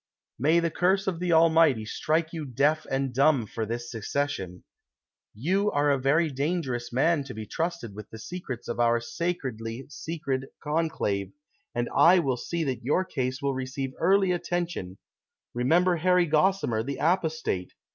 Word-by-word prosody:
"]May 155 +6 +4
the 170 -1 0
curse 190 +4 +2
of 180 -4 -2
the 180 -1 -1
Almighty 160 -7 +5
strike 160 +8 -1
you 160 -2 -4
deaf 145 +4 +1
and 135 -1 -1
dumb 135 -2 +3
for 110 +1 -4
tliis 120 +2 -3
secession! 115 -5 -3 0.7
You 190 - +1
are 145 -3 +2
a 140 - +2
very 150 +4 +2
dangerous 135 -4 -2
man 145 +4 +2
to 125 - -8
be 110 0 -6
trusted 165 - -3
with 105 0 -9
the 110 - -9
secrets 130 -2 -7
of 120 - -4
our 120 0 +3
sacredly 125 -4 -4
secret 140 -4 -4
con 160 +2 0
clave, 100 -10 -2 0.4
and 120 0 0
I 180 +3 +7
will 135 -7 +1
see 170 +6 -3
that 130 -5 -3
your 150 +9 +1
case 130 -3 -3
will 140 -1 +1
receive 130 +1 -4
early 190 +2 +3
atten 175 0 -1
tion; 95 - -7 0.6
remember 170 +9 +3
Harry 180 +1 +3
Gossimer, 150 - +2
the 140 +3 -4
apostate 160 - 0
145 Hz, 165 wpm, -27 LUFS, 120-170 Hz, 0.7 s, I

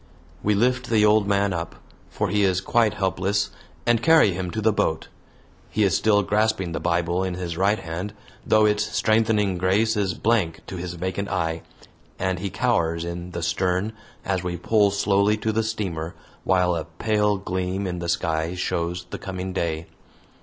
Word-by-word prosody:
We 105 0 +2
lift 125 +4 +1
the 110 -2 +4
old 105 -1 +4
man 100 -1 +2
up, 85 -1 -4 0.3
for - - -2
he 105 - +1
is 95 -2 +2
quite 110 +2 +2
helpless, 95 0 0 0.3
and 120 -1 +3
carry 160 -7 +6
him 90 0 -3
to 110 - -3
the 110 0 +2
boat. 80 -5 -1 0.6
He 110 - +1
is 95 -5 +3
still 105 -2 +3
grasping 105 -3 +1
the - - -3
Bible 85 +1 0
in 95 -2 -2
his 90 -2 -4
right 100 +4 +2
hand, 85 +5 -5 0.3
though 110 0 +4
its 105 0 +2
strengthening 110 -4 +1
grace 100 +5 +2
is 100 -3 0
blank 105 -8 +1
to 95 - -7
his 90 0 -5
vacant 95 +3 -3
eye, 80 -1 -1 0.6
and 95 -1 -1
he 100 +2 -3
cowers 85 -9 0
in 85 +1 -5
the 85 -1 -5
stern 90 +5 0 0.3
as 95 -2 0
we 90 -1 -3
pull 105 +3 +3
slowly 100 +1 +2
to 110 +1 -1
the 110 +1 +1
steamer 95 -7 -3 0.3
while 90 -2 +3
a 80 - -3
pale 105 +5 0
gleam 95 0 -2
in 90 -1 -3
the 85 -1 -4
sky 80 0 -1
shows 90 0 -2
the - - -5
coming 95 -1 -5
day. 85 -3 -2
95 Hz, 180 wpm, -24 LUFS, 85-105 Hz, 0.6 s, carry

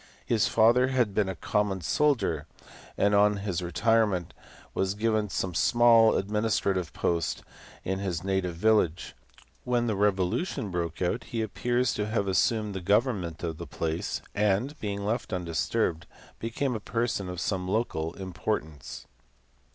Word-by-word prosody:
His 115 -1 +2
father 120 +3 +4
had 125 -6 +1
been 100 -1 +1
a 95 - -3
common 100 +2 -1
soldier, 85 - +1 0.5
and 100 0 +3
on 105 0 +4
his 95 -4 -1
retirement 95 -1 +1 0.4
was 95 +1 0
given 110 -1 0
some 95 -1 -2
small 115 +4 +5
adminis 105 +2 0
trative 95 -4 -1
post 85 -2 -1 0.4
in 95 +1 -2
his 90 -4 -3
native 95 -3 -1
village: 95 -3 +1 0.5
when 120 -1 +1
the 110 -3 0
revolution 100 - 0
broke 85 0 -2
out 115 +7 -1
he 115 -1 -2
appears 120 +3 0
to 105 - -2
have 105 -2 -1
assumed 105 +2 +1
the 95 - -4
government 100 -4 0
of 80 -2 -3
the 85 - -6
place, 80 +3 -3
and, 105 +8 +1
being 100 -1 -3
left 115 +3 -2
undisturbed, 85 -2 -1 0.3
became 125 +4 -2
a 110 - -3
person 110 -3 -2
of 90 -1 -5
some 95 -2 -2
local 90 -6 -1
importance. 85 -5 -4
100 Hz, 145 wpm, -28 LUFS, 90-115 Hz, 0.5 s, small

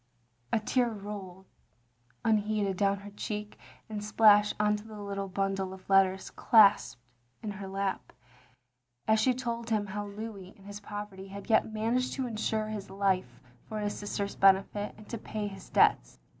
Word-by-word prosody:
A 230 - +3
tear 245 +3 +1
rolled 200 -3 -8 0.8
unheeded 210 -2 +1
down 200 0 +1
her 205 0 -10
cheek 210 0 -5 0.3
and 210 -1 -5
splashed 210 -1 +5
on 210 0 +3
to 210 - -10
the 215 -1 -9
little 200 -1 -4
bundle 195 0 -2
of 185 - -17
letters 190 -1 +3
clasped 205 - +5 0.4
in 215 - -3
her 195 -1 -7
lap, 190 -9 -3 1.0
as 220 0 +4
she 250 +3 +3
told 235 -2 -4
him 215 -2 +1
how 205 +1 -5
Louis 200 -2 -8
in 195 - -18
his 205 +1 -8
poverty 205 -2 -7
had 200 +4 -7
yet 220 - +3
managed 230 +4 0
to 265 - -2
insure 220 -2 -1
his 210 -2 -5
life 190 -9 0 0.3
for 215 - -4
his 205 0 -2
sister's 200 -1 -3
benefit, 195 +2 +3
and 215 - -14
to 230 - -4
pay 215 0 -4
his 195 -2 -8
debts. - - +3
205 Hz, 165 wpm, -30 LUFS, 195-215 Hz, 1.0 s, splashed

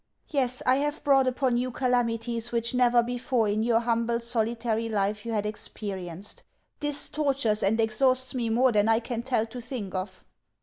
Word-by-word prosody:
Yes, 255 -4 +1
I 255 +1 +4
have 295 +2 -2
brought 270 -3 +4
upon 255 -1 +1
you 250 +1 -1
calamities 240 -2 -1
which 235 0 -1
never 245 -1 +4
before 245 -1 -1
in 210 +1 0
your 230 0 +2
humble, 235 0 0
solitary 230 -1 -1
life 205 +1 -1
you - - -2
had 210 -2 -1
experienced. 195 -3 -4 0.4
This 295 -1 +2
tortures 275 -8 0
and 220 +4 +1
exhausts 255 +3 +2
me 240 -3 -1
more 245 +3 +3
than 210 0 +2
I 225 0 +4
can 235 0 -4
tell 240 -3 0
to 245 +2 -8
think 230 -6 -6
of. 185 0 -5
235 Hz, 175 wpm, -27 LUFS, 220-255 Hz, 0.4 s, I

